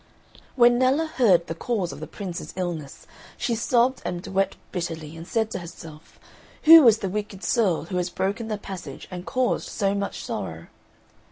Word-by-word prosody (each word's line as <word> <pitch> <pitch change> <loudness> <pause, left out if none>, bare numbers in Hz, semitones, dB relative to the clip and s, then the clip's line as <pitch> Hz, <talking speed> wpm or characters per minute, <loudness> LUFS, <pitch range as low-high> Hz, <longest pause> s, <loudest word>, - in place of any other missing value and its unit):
When 240 -1 +5
Nella 265 +5 +3
heard 215 - +3
the 165 - -4
cause 190 0 -2
of 140 - -9
the 155 - -6
Prince's 185 -4 -7
illness 170 -6 -4 0.3
she 240 - -1
sobbed 240 +2 +2
and 175 0 -4
wept 195 0 0
bitterly 165 -4 -5
and 165 +1 -9
said 220 0 0
to - - -3
herself, 165 -2 -12 0.4
"Who 320 -4 +10
is 225 -1 +7
the - - 0
wicked 205 0 -5
soul 205 -9 +1
who 180 +2 -4
has 180 0 -1
broken 195 +5 -2
the 215 -1 -2
passage 180 -9 -8
and 180 0 -7
caused 255 -1 0
so 195 -2 0
much 200 0 -3
sorrow?" - - -5
195 Hz, 175 wpm, -25 LUFS, 175-235 Hz, 0.4 s, Who